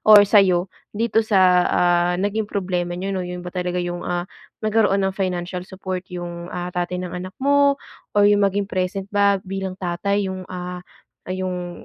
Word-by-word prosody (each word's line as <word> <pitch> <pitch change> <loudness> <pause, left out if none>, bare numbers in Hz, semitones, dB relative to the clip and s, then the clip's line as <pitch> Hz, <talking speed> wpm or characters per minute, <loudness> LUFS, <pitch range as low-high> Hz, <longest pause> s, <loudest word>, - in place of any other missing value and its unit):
or 210 -1 +8
sayo 190 -3 +4 0.2
dito 225 0 +2
sa, 185 -5 +4
ah, 175 0 +3
naging 205 +3 -1
problema 180 -3 -2
niyo, 195 +2 -3
'no? 190 - -1
Yun 180 0 -5
ba 180 - -7
talaga 180 -1 -2
yung, 175 0 -3
ah, 175 0 -2 0.4
nagkaroon 210 -2 +3
ng 190 - -1
financial 180 -1 -2
support 185 -1 -5
yung, 175 -1 -6
ah, 180 0 -5
tatay 180 0 -2
ng 180 - -6
anak 185 +1 -6
mo 280 +1 +3 0.4
or 205 - +6
yung 205 0 +5
maging 200 0 +2
present 190 0 -2
ba 200 -1 +4
bilang 190 -1 -4
tatay 200 +2 -1
yung, 190 -1 -5
ah, 180 0 -5 0.5
yung 180 -1 -4
185 Hz, 170 wpm, -22 LUFS, 180-200 Hz, 0.5 s, or